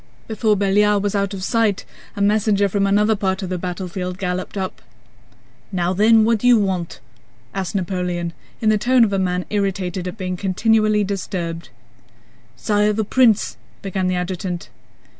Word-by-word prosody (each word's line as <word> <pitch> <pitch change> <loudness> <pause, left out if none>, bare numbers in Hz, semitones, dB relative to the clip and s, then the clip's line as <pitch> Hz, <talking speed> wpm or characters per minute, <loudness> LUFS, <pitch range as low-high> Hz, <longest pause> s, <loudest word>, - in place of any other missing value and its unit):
Before 215 -1 +1
Belliard 205 +1 +2
was 205 - -1
out 200 -1 0
of 185 - -6
sight, 220 -2 +1 0.3
a 200 - 0
messenger 205 -1 +2
from 200 +1 0
another 210 +2 +3
part 195 -1 -1
of 185 - -4
the 185 -1 -2
battlefield 180 0 -4
galloped 185 0 -3
up. 190 -1 -4 0.9
"Now 180 -1 0
then, 220 +3 +5
what 230 -1 +2
do 245 - +1
you 245 -1 +7
want?" 190 -5 -2 0.5
asked 195 +1 -3
Napoleon 180 -2 -2 0.3
in 220 - +3
the 215 -1 +3
tone 250 +2 +4
of 205 -3 +1
a 195 - +1
man 180 -1 -1
irritated 190 -3 -2
at 180 - -6
being 185 -2 -3
continually 215 +2 +2
disturbed. 175 -5 -4 0.9
"Sire, 210 - +1
the 215 0 -1
prince..." 225 -2 +3 0.3
began 190 -1 -1
the 185 - 0
adjutant. 180 0 -4
195 Hz, 160 wpm, -20 LUFS, 185-210 Hz, 0.9 s, you